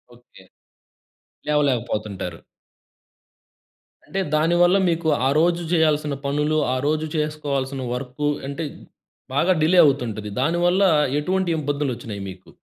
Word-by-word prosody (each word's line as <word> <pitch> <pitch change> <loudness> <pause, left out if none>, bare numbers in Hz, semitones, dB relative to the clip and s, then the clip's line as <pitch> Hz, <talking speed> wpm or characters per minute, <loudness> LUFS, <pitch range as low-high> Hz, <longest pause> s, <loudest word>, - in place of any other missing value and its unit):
Okay. 120 -5 -19 1.1
లేవలేకపోతుంటారు. 120 -8 -1 1.7
అంటే 195 - -4 0.2
దాని 165 +3 +2
వల్ల 180 +3 +5
మీకు 165 -1 -1 0.2
ఆ - - +2
రోజు 170 +1 +2
చేయాల్సిన 150 -3 +2
పనులు 150 +2 0 0.2
ఆ - - 0
రోజు 155 +1 0
చేసుకోవాల్సిన 140 -3 -2
వర్కు 135 +3 -3 0.2
అంటే 140 +4 -4 0.7
బాగా 170 +7 +3
డిలే 180 +3 +4
అవుతుంటది. 115 -7 -1
దానివల్ల 175 +5 +2 0.4
ఎటువంటి 185 +3 -1
ఇబ్బందులు 145 -2 -1
వచ్చినయి 105 -4 -7
మీకు? 95 0 -12
150 Hz, 110 wpm, -22 LUFS, 130-165 Hz, 1.7 s, వల్ల